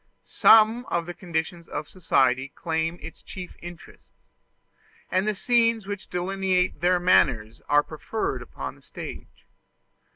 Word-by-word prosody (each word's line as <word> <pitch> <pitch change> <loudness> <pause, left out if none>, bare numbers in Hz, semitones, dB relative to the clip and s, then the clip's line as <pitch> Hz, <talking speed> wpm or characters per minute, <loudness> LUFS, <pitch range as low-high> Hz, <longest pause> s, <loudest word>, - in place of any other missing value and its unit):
Some 225 +2 +5
of 170 -1 -1
the 175 - -6
conditions 170 -2 -4
of 150 - -5
society 130 -7 +1
claim 165 +1 -2
its 165 - -10
chief 180 -1 -9
interest; 175 0 -12 1.0
and 185 +3 +1
the 215 - 0
scenes 230 -1 +2
which 200 -1 -6
delineate 185 0 0
their 180 +1 +3
manners 115 -11 +2
are 145 0 +5
preferred 165 +9 -4
upon - - -7
the - - -21
stage. - - -10
175 Hz, 130 wpm, -25 LUFS, 160-195 Hz, 1.0 s, Some